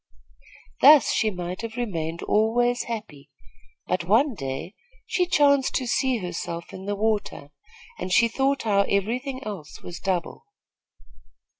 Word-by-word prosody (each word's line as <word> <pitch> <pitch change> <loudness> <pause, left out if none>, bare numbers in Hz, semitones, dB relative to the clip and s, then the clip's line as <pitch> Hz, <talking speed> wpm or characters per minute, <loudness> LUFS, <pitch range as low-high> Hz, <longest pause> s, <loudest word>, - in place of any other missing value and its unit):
Thus 290 -2 +8
she 220 - +1
might 180 -1 -5
have 230 -1 -6
remained 170 -8 -3
always 240 +3 +1
happy; 160 -11 -7 0.6
but 180 -1 -1
one 235 - +3
day 135 +1 -5 0.3
she 360 -2 0
chanced 285 -5 +3
to 255 - 0
see 255 +1 +1
herself 170 -3 -5
in 190 - -8
the 205 0 -2
water, 205 -9 -2 0.5
and 185 +1 -4
she 230 +5 +5
thought 270 +4 0
how 205 -3 +3
every 205 +5 +1
thing 265 0 -6
else 195 -10 -8
was 175 - -8
double. 180 -3 -3
215 Hz, 140 wpm, -25 LUFS, 180-245 Hz, 0.6 s, Thus